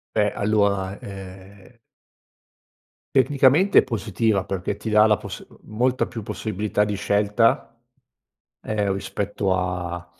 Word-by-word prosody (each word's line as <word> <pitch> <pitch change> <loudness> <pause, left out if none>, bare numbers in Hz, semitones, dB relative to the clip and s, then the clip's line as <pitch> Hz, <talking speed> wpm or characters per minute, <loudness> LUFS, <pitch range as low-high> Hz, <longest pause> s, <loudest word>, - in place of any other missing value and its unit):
Beh, 105 -1 +2
allora, 100 -2 0
ehm 95 +3 -11 1.4
tecnicamente 140 +7 +4
è - - -5
positiva, 105 -2 -1
perché 95 -2 -3
ti - - -6
dà 105 0 +5
la 105 - +4
poss - - -8 0.2
molta 125 +4 0
più 115 -3 -7
possibilità 105 0 -2
di 105 0 -3
scelta, 105 +3 +1 0.9
ehm, 105 -2 -1
rispetto 100 0 -2
a 90 -1 -3
105 Hz, 110 wpm, -23 LUFS, 95-110 Hz, 1.4 s, dà